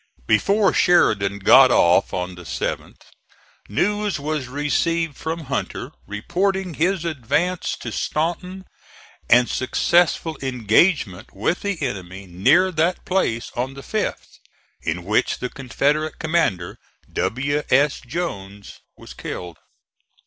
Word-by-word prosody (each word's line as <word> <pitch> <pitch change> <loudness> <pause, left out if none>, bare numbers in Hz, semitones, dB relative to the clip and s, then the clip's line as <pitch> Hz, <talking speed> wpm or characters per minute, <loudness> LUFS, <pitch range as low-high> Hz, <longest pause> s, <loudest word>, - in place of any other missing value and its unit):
Before 200 - +3
Sheridan 100 - +3
got 130 +7 +7
off 90 -4 +4
on 90 0 -3
the 90 - -11
7th 85 - -5 0.7
news 205 - 0
was 150 -2 -3
received 150 +3 -1
from 160 +3 -4
Hunter 135 -3 -4 0.2
reporting 185 - -1
his 170 +3 0
advance 170 +4 -1
to - - -5
Staunton 180 +4 -3 0.6
and 125 +1 +6
successful 165 +3 +1
engagement 125 - +1
with 110 - 0
the 200 -4 -2
enemy 95 -6 -5
near 130 - +3
that 165 +2 0
place 125 -11 -1
on 130 +2 -3
the 135 - -9
5th, 215 -1 -4 0.4
in 85 +2 -3
which 105 +4 +1
the 125 - -5
Confederate 145 +4 -1
commander, 155 - -1 0.3
W. 140 +5 -1
S. 145 0 +3
Jones, 105 - -6 0.2
was - - -12
killed. 85 -3 -7
140 Hz, 115 wpm, -22 LUFS, 105-170 Hz, 0.7 s, got